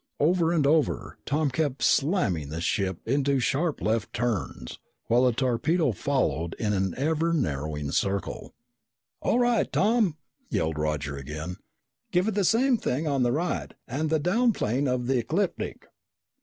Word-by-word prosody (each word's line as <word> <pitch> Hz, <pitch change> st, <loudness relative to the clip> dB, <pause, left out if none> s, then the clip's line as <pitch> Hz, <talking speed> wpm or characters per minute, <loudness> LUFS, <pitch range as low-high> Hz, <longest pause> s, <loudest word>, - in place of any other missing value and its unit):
Over 165 Hz, +2 st, +3 dB
and 160 Hz, -4 st, +2 dB
over, 155 Hz, +1 st, +1 dB
Tom 150 Hz, -1 st, +1 dB
kept 140 Hz, -1 st, -1 dB
slamming 135 Hz, -, +2 dB
the 80 Hz, +2 st, -4 dB
ship 95 Hz, 0 st, -1 dB
into 140 Hz, +2 st, +2 dB
sharp 150 Hz, +4 st, 0 dB
left 110 Hz, 0 st, -1 dB
turns, 110 Hz, -, -3 dB, 0.3 s
while 120 Hz, +2 st, +3 dB
the 125 Hz, -, +4 dB
torpedo 130 Hz, +6 st, +1 dB
followed 85 Hz, -4 st, -1 dB
in 105 Hz, -2 st, -1 dB
an 95 Hz, -2 st, 0 dB
ever 160 Hz, +4 st, +1 dB
narrowing 75 Hz, -, -2 dB
circle. 100 Hz, +4 st, -2 dB, 0.7 s
"All -, -, +2 dB
right, 240 Hz, -2 st, +2 dB
Tom!" 210 Hz, -6 st, +2 dB, 0.3 s
yelled 80 Hz, -1 st, -1 dB
Roger 75 Hz, -2 st, -2 dB
again. 75 Hz, +6 st, -6 dB, 0.5 s
"Give 180 Hz, +2 st, +2 dB
it 220 Hz, -, 0 dB
the 200 Hz, 0 st, +1 dB
same 245 Hz, +6 st, +3 dB
thing 155 Hz, -, -2 dB
on 140 Hz, -3 st, +1 dB
the 120 Hz, -1 st, +3 dB
right 170 Hz, +7 st, -2 dB
and 150 Hz, +6 st, -2 dB
the 160 Hz, -, +3 dB
down 225 Hz, +10 st, +2 dB
plane 135 Hz, -, 0 dB
of 125 Hz, -1 st, 0 dB
the 130 Hz, 0 st, +2 dB
ecliptic!" 170 Hz, -, -2 dB
135 Hz, 155 wpm, -27 LUFS, -, 0.7 s, the